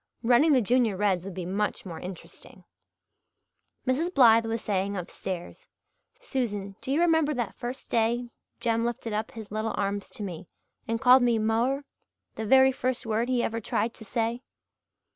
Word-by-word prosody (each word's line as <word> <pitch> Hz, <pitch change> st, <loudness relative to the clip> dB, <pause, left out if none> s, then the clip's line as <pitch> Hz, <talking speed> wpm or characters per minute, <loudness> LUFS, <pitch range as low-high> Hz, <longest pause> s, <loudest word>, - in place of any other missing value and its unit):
Running 250 Hz, +7 st, +5 dB
the 255 Hz, -3 st, +4 dB
Junior 235 Hz, -2 st, +2 dB
Reds 190 Hz, -3 st, +1 dB
would 195 Hz, -3 st, -7 dB
be 185 Hz, -2 st, -4 dB
much 205 Hz, +4 st, -2 dB
more 170 Hz, -4 st, -7 dB
interesting. 180 Hz, -1 st, -10 dB, 1.2 s
Mrs. 290 Hz, +7 st, 0 dB
Blythe 230 Hz, -7 st, +6 dB
was 225 Hz, 0 st, -3 dB
saying 200 Hz, 0 st, -1 dB
upstairs, 180 Hz, 0 st, -6 dB, 0.5 s
"Susan, 210 Hz, -, -3 dB
do 265 Hz, -, -4 dB
you 290 Hz, -, +2 dB
remember 320 Hz, -3 st, +3 dB
that 240 Hz, -5 st, -2 dB
first 250 Hz, +2 st, -7 dB
day 235 Hz, +1 st, +1 dB, 0.3 s
Jem 230 Hz, -1 st, +1 dB
lifted 235 Hz, -1 st, -3 dB
up 215 Hz, +1 st, -2 dB
his 220 Hz, -3 st, -9 dB
little 215 Hz, +1 st, -2 dB
arms 200 Hz, 0 st, -2 dB
to 210 Hz, -, -6 dB
me 180 Hz, -2 st, -6 dB, 0.4 s
and 230 Hz, 0 st, -1 dB
called 255 Hz, +1 st, +7 dB
me 240 Hz, -2 st, +3 dB
'mo'er' 230 Hz, +6 st, +1 dB, 0.5 s
the 220 Hz, -, -5 dB
very 265 Hz, +2 st, +6 dB
first 255 Hz, -1 st, -2 dB
word 225 Hz, +2 st, 0 dB
he 250 Hz, -2 st, +1 dB
ever 230 Hz, 0 st, -2 dB
tried 225 Hz, +2 st, -1 dB
to -, -, -12 dB
say?" 230 Hz, +2 st, -2 dB
230 Hz, 165 wpm, -27 LUFS, 205-250 Hz, 1.2 s, called